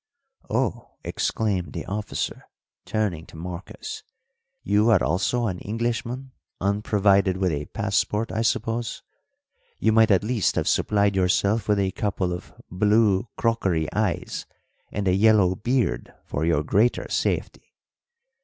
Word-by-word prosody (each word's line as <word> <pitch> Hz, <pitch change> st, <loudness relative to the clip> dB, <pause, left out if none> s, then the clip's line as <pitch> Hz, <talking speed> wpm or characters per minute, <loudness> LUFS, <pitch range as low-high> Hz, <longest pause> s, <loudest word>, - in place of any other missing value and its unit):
"Oh!" 120 Hz, +1 st, -2 dB
exclaimed 95 Hz, -8 st, -1 dB
the -, -, -5 dB
officer, 105 Hz, +2 st, -4 dB, 0.4 s
turning 95 Hz, -7 st, -2 dB
to -, -, -13 dB
Marcos, 85 Hz, +1 st, -7 dB, 0.6 s
"you 105 Hz, +3 st, +3 dB
are 110 Hz, -5 st, +4 dB
also 100 Hz, +6 st, +1 dB
an 95 Hz, -5 st, -2 dB
Englishman 120 Hz, +4 st, -3 dB, 0.3 s
unprovided 100 Hz, -1 st, +2 dB
with 95 Hz, -2 st, +1 dB
a 75 Hz, -1 st, -3 dB
passport, 105 Hz, +1 st, -1 dB
I 110 Hz, -, -1 dB
suppose? 115 Hz, +1 st, -1 dB, 0.7 s
You -, -, +2 dB
might 110 Hz, 0 st, +5 dB
at 100 Hz, -1 st, +4 dB
least 110 Hz, -3 st, +1 dB
have -, -, 0 dB
supplied 100 Hz, -1 st, +2 dB
yourself 100 Hz, +3 st, +2 dB
with 105 Hz, -1 st, +3 dB
a 95 Hz, -1 st, +1 dB
couple 95 Hz, -3 st, -1 dB
of 90 Hz, -, -7 dB, 0.2 s
blue 105 Hz, +2 st, +3 dB
crockery 95 Hz, -9 st, +1 dB
eyes -, -, -2 dB, 0.4 s
and 100 Hz, -1 st, -2 dB
a 90 Hz, -, +4 dB
yellow 100 Hz, -2 st, +5 dB
beard 110 Hz, -, -1 dB
for 75 Hz, -, -2 dB
your 80 Hz, -3 st, +2 dB
greater 110 Hz, +10 st, +2 dB
safety." -, -, -2 dB
100 Hz, 130 wpm, -24 LUFS, 95-110 Hz, 0.7 s, might